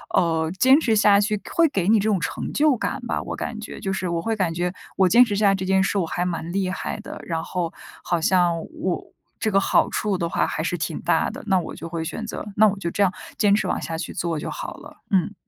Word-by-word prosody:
呃， 165 -3 +2
坚 265 +6 +6
持 225 -8 +2
下 205 -1 +5
去 210 0 0
会 335 -1 +5
给 195 - -1
你 220 -1 +5
这 210 - 0
种 200 - +3
成 - - -4
就 295 -4 +3
感 - - -3
吧， - - -1
我 - - -5
感 220 -2 -5
觉。 220 - -8
就 195 -2 -2
是 190 -1 -2
我 170 -1 -1
会 225 +2 -1
感 175 -4 0
觉 175 +2 -1 0.2
我 190 -2 +4
坚 245 +6 +7
持 205 -3 -2
下 205 0 +3
来 195 - +4
这 190 0 -4
件 190 0 +3
事 200 - 0
我 180 - +1
还 175 - -2
蛮 170 -1 -3
厉 190 -2 0
害 185 - -4
的， - - -8
然 165 -1 -2
后 175 -3 -3 0.3
好 170 -2 0
像 175 -1 +3
我 185 -2 -2 0.3
这 220 - -1
个 195 - +4
好 - - +3
处 205 -3 -1
的 170 -2 -2
话 - - +1
还 - - -3
是 - - -1
挺 - - -3
大 - - +2
的， - - -9
那 190 -2 +3
我 - - -6
就 165 +2 -7
会 165 -1 -3
选 225 +7 -5
择 220 - -6
那 215 +1 +6
我 195 - -4
就 170 - -2
这 200 - +1
样 185 - +3 0.3
坚 205 -1 +4
持 210 - +1
往 - - -1
下 165 -1 -4
去 170 - -5
做 165 -3 -2
就 - - -5
好 - - -6
了。 - - -13
嗯。 190 +1 +2
190 Hz, 285 characters per minute, -23 LUFS, 170-210 Hz, 0.3 s, 坚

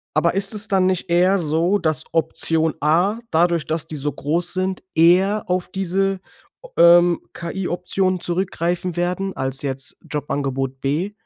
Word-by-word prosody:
Aber 165 +2 +2
ist 195 +2 0
es 210 +1 +1
dann 190 -2 +2
nicht 185 -1 -1
eher 180 +3 +3
so, 170 +4 +1
dass 160 -6 0
Option 160 0 +1
A 175 +9 +2
dadurch, 170 0 +2
dass 160 -1 -2
die 155 - -7
so 145 +1 -2
groß 170 +4 -1
sind, 185 0 -2
eher 185 +6 +4
auf 180 0 -1
diese, 195 +1 -1 0.4
o - - -13
ähm, 175 0 +6
KI-Optionen 180 +1 -2
zurückgreifen 175 0 -2
werden 180 +2 -2
als 135 +1 -2
jetzt 135 -1 -3
Jobangebot 135 -2 -3
B? 160 +9 -1
175 Hz, 150 wpm, -21 LUFS, 155-190 Hz, 0.4 s, ähm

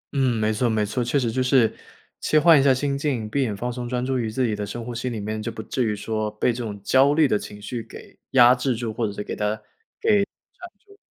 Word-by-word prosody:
嗯， 130 -3 +2
没 110 0 +1
错 120 +3 +1
没 110 -1 +1
错， 120 +4 -2
确 120 +4 0
实 120 -4 0
就 130 - -1
是 125 -3 +3 0.5
切 155 - +3
换 160 -1 +7
一 - - +3
下 140 - +5
心 140 +2 0
境， 140 -6 -2
闭 125 +6 -1
眼 110 -6 -1
放 120 +4 -3
松 120 -1 -5
专 125 0 -1
注 130 -1 0
于 115 -2 -2
自 125 +4 0
己 110 -3 0
的 105 - -4
深 115 +3 -6
呼 120 - -5
吸 125 +2 -3
里 115 -3 -4
面， 110 +1 -4
就 115 - -4
不 110 -1 -7
至 125 - -1
于 110 -2 0
说 110 +1 -2
被 105 +3 0
这 120 +1 -5
种 105 -3 -6
焦 135 +6 +4
虑 155 -1 +5
的 105 - +1
情 105 - -9
绪 115 +3 -5
给 - - -13 0.2
压 125 -2 +7
制 125 0 -1
住， 115 -1 -4
或 115 0 -1
者 105 - -4
是 105 - -5
给 - - -5
它 105 0 -1
给 - - -19 1.2
缠 405 - -19
住。 - - -50
120 Hz, 295 characters per minute, -23 LUFS, 110-130 Hz, 1.2 s, 换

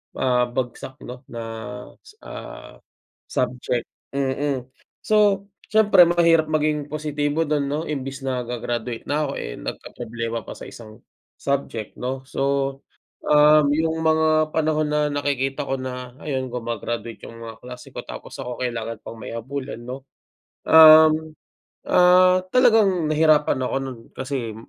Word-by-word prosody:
ah, 125 -1 +2
bagsak, 125 +1 -5
'no, 125 +1 -8
na 115 -1 -7 0.6
s 425 - -18
na - - -9 0.9
subject. 125 -1 -2 0.3
Mm. 135 -1 -1 0.4
So, 205 -2 +3 0.2
siyempre 210 -5 +6
mahirap 165 -2 +4
maging 150 -1 0
positibo 150 +1 -1
dun, 145 -2 0
'no, 150 +3 -2
imbes 135 -3 -5
na 130 -1 -1
ga-graduate 120 -1 -4
na 150 0 -1
ako - - -4
eh, - - -6
nagkaproblema 115 -2 -6
pa - - -7
sa - - -11
isang 110 -2 -12 0.3
subject, 135 -6 -3
'no. 130 +1 -4
So, 135 0 -1 0.5
um, 150 0 +6
yung 160 0 0
mga 155 -1 +3
panahon 155 -1 +1
na 150 0 +1
nakikita 140 0 -1
ko 135 - 0
na, 125 -1 -6
ayun, 130 -3 -3
guma-graduate 120 -1 -5
yung 115 0 -12
mga 115 -1 -8
kaklase 125 +1 -10
ko - - -7
tapos - - -9
ako 125 -1 -6
kailangan 115 -2 -3
pang 115 - -9
may - - -7
habulin, 130 0 -6
'no. 130 +2 -8 0.6
Um, 155 0 +7 0.5
ah, 180 +1 +5
talagang 215 -10 +4
nahirapan 155 -3 +3
ako 125 - -2
nun 130 -3 -6 0.2
kasi 130 -4 -4
140 Hz, 135 wpm, -23 LUFS, 125-155 Hz, 0.9 s, Um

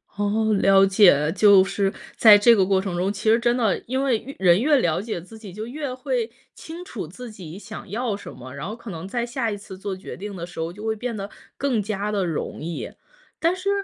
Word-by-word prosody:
哦， 215 +2 +1
了 195 0 +6
解， 180 -7 +5
就 200 -1 +7
是 195 +1 -1 0.3
在 215 -2 +9
这 230 +3 +6
个 195 - +3
过 190 0 +2
程 190 -2 -4
中， 185 +3 0
其 210 +2 +1
实 225 - +4
真 240 +1 +1
的， 225 -5 +1
因 260 +2 -1
为 255 -5 +2
越 275 +4 -10
人 180 +2 +4
越 295 +1 +4
了 175 -9 +1
解 215 -4 -4
自 200 +6 -13
己， 210 -4 -10
就 215 +4 -6
越 280 +3 -5
会 255 -3 -2 0.2
清 335 +3 -9
楚 215 - -6
自 235 +8 -10
己 180 -5 -10
想 210 0 -9
要 225 +1 -2
什 205 - -9
么， 130 +1 -11
然 140 +4 -6
后 215 - -5
可 235 -2 -9
能 165 +1 -7
在 235 +4 -2
下 240 -1 -2
一 205 - -3
次 200 -1 -10
做 195 0 -4
决 185 - -9
定 200 +1 -7
的 170 -2 -5
时 175 -1 -11
候， 165 +1 -2
就 210 +4 -11
会 220 0 0
变 235 +1 -4
得 200 0 -5 0.3
更 260 -6 0
加 210 0 -3
地 200 -2 0
容 165 -3 -4
易。 165 +1 -5 0.5
但 335 +3 +2
是 370 +2 -3
210 Hz, 260 characters per minute, -23 LUFS, 190-235 Hz, 0.5 s, 在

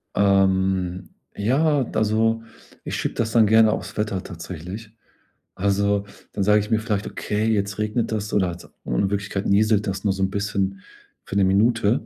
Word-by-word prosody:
Ähm, 95 -2 +2 0.3
ja, 140 +7 +2
also, 110 +1 +1 0.4
ich - - -3
schiebe - - -2
das 115 -1 -1
dann 110 -3 +5
gerne 110 0 +5
aufs - - -6
Wetter 105 -3 -1
tatsächlich. 90 +5 -8 0.6
Also, 100 +1 +1 0.3
dann 100 - -1
sage 105 +1 +4
ich 105 +1 -4
mir 110 -2 +2
vielleicht: 105 -2 -2
„Okay, 105 +1 -2
jetzt 100 -2 0
regnet 105 +2 -1
es” 105 -1 -3
oder 95 -3 +2
halt 85 0 -8 0.2
in - - 0
Wirklichkeit 100 -1 -3
nieselt 105 +1 +3
das 95 0 -3
nur 100 -2 +2
so 95 0 -2
'n 95 - +1
bisschen 100 -1 -2 0.4
für - - -7
'ne 100 - +4
Minute 110 +3 +2
100 Hz, 170 wpm, -23 LUFS, 95-110 Hz, 0.6 s, dann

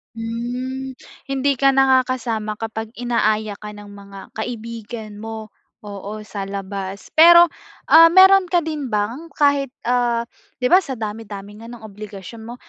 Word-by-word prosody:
Hmm. 245 +4 -5 0.3
Hindi 275 +1 0
ka 275 +2 +4
nakakasama 255 -5 +1
kapag 225 0 -5
inaaya 215 -3 0
ka 210 0 -9
ng 205 0 -12
mga 200 -1 -12 0.2
kaibigan 225 -1 -6
mo 220 0 -7 0.3
oo, 205 +1 -7
sa 205 -2 -6
labas. 195 0 -6
Pero, 340 +2 +8 0.4
ah, 330 +1 +9
mayro'n 380 +1 +7
ka 350 0 +2
din 305 -3 -4
bang 220 +10 -2
kahit, 285 -3 +2 0.2
ah, 240 -1 +1 0.4
'di 250 - +3
ba 365 - +8
sa 265 - -5
dami-dami 210 -1 -7
nga 225 - -11
no'ng 235 -1 -11
obligasyon 210 +1 -10
mo, 235 - -7
225 Hz, 140 wpm, -20 LUFS, 210-265 Hz, 0.4 s, ah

